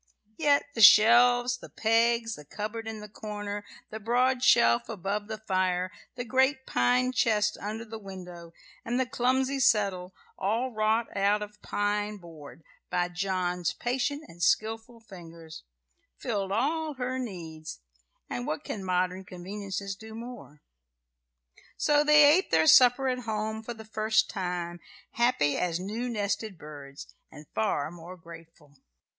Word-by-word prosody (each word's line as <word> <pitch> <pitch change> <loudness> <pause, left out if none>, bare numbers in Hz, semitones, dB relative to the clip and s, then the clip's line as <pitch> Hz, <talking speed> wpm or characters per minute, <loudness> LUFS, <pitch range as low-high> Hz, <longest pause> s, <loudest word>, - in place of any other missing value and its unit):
Yet 290 -2 +3
the 230 - -2
shelves, 245 +4 +7
the - - -11
pegs, 230 +1 +1
the 150 - -9
cupboard 215 +8 -6
in 220 -1 -6
the 210 - -8
corner, 205 -1 -6 0.3
the 220 - -6
broad 250 +3 +1
shelf 115 0 +4
above 205 0 -3
the 220 0 -5
fire, 185 -3 -1 0.2
the 245 -1 -5
great 265 +2 +1
pine 250 +1 +2
chest 210 -4 +1
under 220 +3 -5
the 225 0 -8
window, 180 -4 -10 0.3
and 240 +2 -1
the 260 - +2
clumsy 260 +2 0
settle, 195 -7 +1 0.2
all 230 +6 0
wrought 220 +1 0
out 200 +1 +2
of 210 0 -12
pine 205 0 -1
board 165 -3 -13 0.3
by 175 0 0
John's 180 -1 -1
patient 265 +4 -2
and 175 - -14
skilful 225 +4 0
fingers, 165 -6 -12 0.6
filled 195 - -3
all 300 +7 -1
her 255 0 -3
needs; 165 - -7 0.5
and 125 0 -4
what 155 - -3
can 200 - -5
modern 185 0 -1
conveniences 195 +2 -6
do 220 +2 -11
more? 230 -10 -10 1.1
So 295 0 +3
they 300 0 +7
ate 315 +6 +4
their 160 -1 +3
supper 250 - +6
at 255 -1 0
home 220 -1 -3
for 235 +1 -7
the 220 0 -11
first 215 0 +1
time, 175 -3 -4 0.3
happy 235 - +1
as 175 -1 -1
new 220 +6 -4
nested 205 -2 -2
birds, 145 -2 -11 0.2
and 150 - -12
far 140 +7 -1
more 175 +2 -11
grateful. 165 -4 -15
210 Hz, 145 wpm, -28 LUFS, 180-240 Hz, 1.1 s, shelves